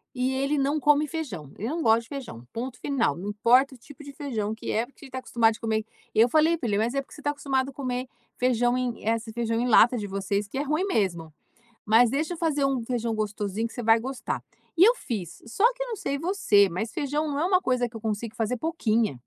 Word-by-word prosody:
E 255 +1 0
ele 275 +3 0
não 285 +3 +1
come 295 +1 +3
feijão. 235 - -5
Ele 220 - -3
não 330 +3 -2
gosta 225 -3 +4
de 230 - -16
feijão. 240 - -8
Ponto 250 +2 -5
final. 245 - 0
Não 190 +4 -5
importa 245 +6 +4
o - - -12
tipo 290 +5 -14
de 280 0 -10
feijão 225 -8 -3
que 220 - -5
é 225 +2 +1
porque 280 +2 -16
ele 265 - -13
tá 260 - -5
acostumado 230 -3 +2
de - - -12
comer 220 -1 -1 0.3
eu 230 +3 +5
falei 315 +3 +4
pra 245 - -3
ele: 200 - +1
"Mas 230 +4 0
é 275 - 0
porque - - -15
você 295 - -12
tá 290 - 0
acostumado 270 -2 -1
a 275 - -11
comer 255 -2 -3 0.3
feijão 245 0 +2
em, 250 -2 -3
eh, 225 - +4
esse 225 0 -6
feijão 230 0 -1
em 245 - 0
lata 245 +2 +6
de 210 - -3
vocês, 200 +1 -2
que 235 - -7
é - - +1
ruim 305 +6 0
mesmo. 170 - -1 0.5
Mas, 225 +2 +5
deixa 305 +6 -1
eu 340 - -7
fazer 295 -4 +1
um 265 -3 0
feijão 230 -1 -2
gostosinho 210 +1 -2
que 225 - -14
você 245 - -5
vai 225 +1 +5
gostar." 260 +2 -4 0.3
E 350 - +7
eu 470 +5 +6
fiz. 195 - -6
Só 230 - -3
que - - -4
eu - - -8
não 455 - -3
sei 280 -8 -2
você, 275 - +3
mas 195 +7 -3
feijão 300 -1 -1
não 285 0 -2
é 330 - +1
uma 370 0 +3
coisa 250 -1 +1
que 230 - -16
eu 225 - -7
consigo 220 0 -3
fazer 235 +1 -1
pouquinho. 235 - 0
245 Hz, 255 wpm, -26 LUFS, 220-285 Hz, 0.5 s, E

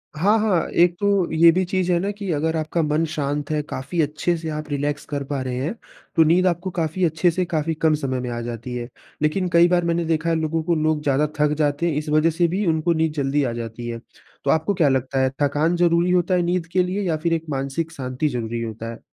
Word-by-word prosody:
हाँ, 205 +8 +3
हाँ। 205 -6 +1
एक 175 0 +3
तो 200 -4 +1
ये 165 +1 +6
भी 185 +3 +1
चीज़ 185 0 0
है 175 - +3
ना 195 - -1
कि 200 -3 -5
अगर 160 +2 0
आपका 155 +2 -1
मन 155 +2 +1
शांत 145 -1 -2
है, 150 - +1
काफ़ी 150 +2 -3
अच्छे 150 +4 0
से 160 0 -5
आप 155 0 -5
रिलैक्स 145 +1 -2
कर 145 -1 -3
पा 140 -1 -3
रहे 130 -1 -3
हैं, 160 +8 -2 0.4
तो 165 - +6
नींद 175 +4 +3
आपको 180 +1 -1
काफ़ी 170 +1 -2
अच्छे 160 +2 +2
से 180 +2 -1
काफ़ी 160 -1 -1
कम 160 0 +2
समय 135 -4 -2
में 125 - -4
आ 120 0 -3
जाती 120 +1 -6
है। 120 -1 -4 0.3
लेकिन 165 +5 +1
कईं 170 +1 +6
बार 175 -1 +2
मैंने 170 0 0
देखा 160 0 0
है 165 - +2
लोगों 160 0 -1
को, 170 +1 +1
लोग 155 -1 +1
ज़्यादा 145 +1 +2
थक 150 0 +3
जाते 145 +2 0
हैं - - -1
इस 150 0 -3
वज़ह 155 +2 +3
से 170 +2 +1
भी 190 +4 -1
उनको 160 +1 +2
नींद 160 -1 0
जल्दी 145 -1 0
आ 125 - -1
जाती 115 0 -6
है। 115 0 -4 0.5
तो - - +3
आपको 160 +6 +1
क्या 165 -6 +3
लगता 130 0 0
है 130 - +3
थकान 150 +4 +2
ज़रूरी 175 0 +3
होता 180 0 +2
है 180 - +2
नींद 175 0 0
के 180 0 +3
लिए? 185 +3 -2
या 170 -5 0
फिर 165 +2 0
एक 165 -1 -1
मानसिक 140 +4 -2
शांति 130 -1 -2
ज़रूरी 120 -3 -3
होता 115 0 -5
है? 115 - -10
160 Hz, 250 wpm, -22 LUFS, 145-170 Hz, 0.5 s, ये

